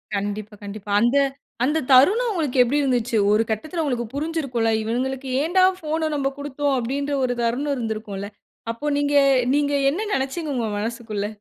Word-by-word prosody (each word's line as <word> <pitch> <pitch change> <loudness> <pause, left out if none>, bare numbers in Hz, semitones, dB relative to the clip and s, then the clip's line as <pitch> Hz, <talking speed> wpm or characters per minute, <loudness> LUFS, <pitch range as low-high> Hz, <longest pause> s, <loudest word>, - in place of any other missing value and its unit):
கண்டிப்பா, 205 +1 -4
கண்டிப்பா. 205 0 -7
அந்த, 240 +5 +3 0.5
அந்த 300 +5 +1
தருணம் 395 - +5
உங்களுக்கு 290 -9 +1
எப்பிடி 285 +5 +1
இருந்துச்சு? 240 -3 +1
ஒரு 215 +2 +4
கட்டத்துல 310 - -2
உங்களுக்கு 245 -5 -2
புரிஞ்சிருக்குல்ல. 280 -7 -1
இவுங்களுக்கு 260 +4 -2
ஏன்டா 370 +4 +4
ஃபோன 315 0 -1
நம்ப 275 -1 0
குடுத்தோம் 285 0 -1
அப்பிடின்ற 280 +4 -2
ஒரு 245 -1 -1
தருணம் 275 +5 0
இருந்திருக்கும்ல. 215 -3 -4 0.4
அப்போ 230 +6 -8
நீங்க, 290 0 0 0.4
நீங்க 290 0 +1 0.2
என்ன 345 +8 -3
நெனைச்சீங்க 285 +3 -2
உங்க 230 -3 -1
மனசுக்குள்ள? 220 -2 -3
265 Hz, 145 wpm, -23 LUFS, 225-290 Hz, 0.5 s, தருணம்